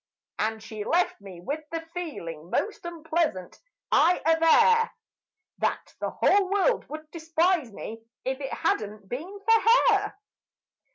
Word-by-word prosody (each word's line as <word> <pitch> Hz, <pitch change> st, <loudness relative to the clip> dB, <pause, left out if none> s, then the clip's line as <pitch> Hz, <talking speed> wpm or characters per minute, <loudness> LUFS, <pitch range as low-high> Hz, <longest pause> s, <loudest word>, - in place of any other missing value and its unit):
And 220 Hz, 0 st, -1 dB
she 220 Hz, -1 st, -6 dB
left 340 Hz, -, +1 dB
me 190 Hz, -3 st, -10 dB
with 290 Hz, -, -4 dB
the 330 Hz, 0 st, -3 dB
feeling 170 Hz, -, -6 dB
most 415 Hz, -, -2 dB
unpleasant, 320 Hz, -, -2 dB, 0.3 s
I 360 Hz, +1 st, +5 dB
aver 455 Hz, +9 st, +5 dB, 0.7 s
That -, -, -2 dB
the -, -, -2 dB
whole 395 Hz, -2 st, +3 dB
world 405 Hz, +5 st, +1 dB
would 310 Hz, +1 st, -8 dB
despise 330 Hz, -4 st, +1 dB
me 225 Hz, +2 st, -8 dB, 0.2 s
if 265 Hz, +1 st, -2 dB
it 270 Hz, -, -4 dB
had -, -, +1 dB
not 210 Hz, -1 st, -9 dB
been 340 Hz, -, -6 dB
for 450 Hz, 0 st, +5 dB, 0.3 s
her. 410 Hz, 0 st, 0 dB
320 Hz, 135 wpm, -27 LUFS, 220-365 Hz, 0.7 s, I